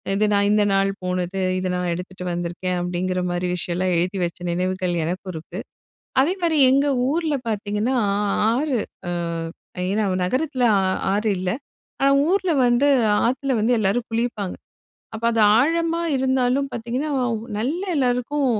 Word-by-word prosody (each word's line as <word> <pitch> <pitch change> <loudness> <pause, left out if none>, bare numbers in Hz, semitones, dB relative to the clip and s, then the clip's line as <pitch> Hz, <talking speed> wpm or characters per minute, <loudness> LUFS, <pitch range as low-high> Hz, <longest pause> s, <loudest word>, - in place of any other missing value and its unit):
இது 215 - +2
நான் 200 0 +3
இந்த 210 0 +4
நாள் 195 0 +3
போனது, 180 +1 -2 0.2
இத 185 - -2
நான் 180 -1 -1
எடுத்துட்டு 180 +1 -7
வந்திருக்கேன். 175 +1 -3
அப்படிங்கிற 180 +1 -2
மாதிரி 175 +1 -1
விஷயம்லாம் 180 +1 -1
எழுதி 180 +3 -1
வச்ச 170 0 -3
நினைவுகள் 185 0 -1
எனக்கும் 185 +2 -4
இருக்கு. 160 - -7 0.6
அதே 310 +7 +3
மாரி 325 -2 +2
எங்க 275 +2 +3 0.2
ஊர்ல 320 -1 0
பாத்தீங்கன்னா, 210 +3 -1 0.2
ஆ - - +1 0.4
ஆறு 270 -2 0 0.3
ஆ - - -1 0.8
ஏன்னா, 210 +1 +1 0.2
நகரத்தில 260 +5 0
ஆ - - +1 0.3
ஆறு 210 +2 0
இல்ல. 180 0 -2 0.5
ஆனா 275 0 +4 0.2
ஊர்ல 375 -2 +2
வந்து 240 +4 +3 0.4
ஆத்துல 265 +2 0
வந்து 225 +4 +2
எல்லாரும் 220 +3 0
குளிப்பாங்க. 225 -4 -2 0.6
அப்ப 220 +1 -6
அது 225 - +1 0.2
ஆழமா 330 +4 +1
இருந்தாலும் 260 +1 +1
பாத்தீங்கன்னா, 245 +6 -3 0.5
நல்லா 310 - -2
எல்லோருக்கும் 260 +2 0
220 Hz, 140 wpm, -22 LUFS, 185-270 Hz, 0.8 s, இந்த